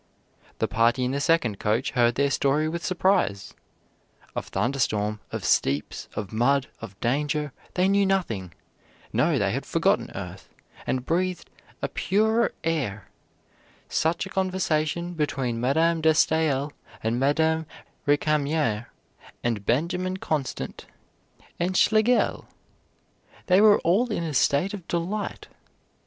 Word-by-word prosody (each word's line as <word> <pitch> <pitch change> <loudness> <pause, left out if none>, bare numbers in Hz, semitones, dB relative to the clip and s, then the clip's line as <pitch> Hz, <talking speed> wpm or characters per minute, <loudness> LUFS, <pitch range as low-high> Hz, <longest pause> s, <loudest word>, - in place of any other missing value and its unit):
The - - 0
party 120 +3 +2
in 125 - -1
the 140 - -1
second 140 - +1
coach 110 +5 0
heard 120 -2 +3
their 140 +1 +2
story 145 +3 +2
with 170 +2 -4
surprise; 175 - +1 0.8
of - - -4
thunder 120 +8 -1
storm, 105 -3 0
of - - -5
steeps, 70 +2 0
of 105 -1 -5
mud, 135 +4 +2
of 100 -3 -10
danger, 145 +3 0 0.2
they 185 0 +3
knew 200 0 +3
nothing; 115 - -1 0.6
no, - - +2
they - - +1
had - - -2
forgotten - - +1
earth, - - -8 0.4
and 130 -1 -1
breathed 180 +2 -1 0.3
a - - +2
purer 220 +4 +1
air; 135 - -2 0.8
such 165 +3 0
a - - -8
conversation 175 -3 -1
between 135 -7 -2
Madame 160 +6 +2
de 160 0 +5
Staël 155 -3 +2 0.3
and 115 +2 0
Madame 160 +3 +2 0.4
Récamier 145 -5 +1 0.6
and 110 -5 -2
Benjamin 180 +8 0
Constant 150 -7 -4 0.7
and 185 +2 0
Schlegel! 220 +3 +3 1.0
they 185 +2 +5
were 210 -1 +7
all 215 +8 +2
in 170 - -1
a 160 -2 -3
state 145 +8 +2
of 185 -5 -8
delight. 180 +5 -3
150 Hz, 130 wpm, -25 LUFS, 120-175 Hz, 1.0 s, were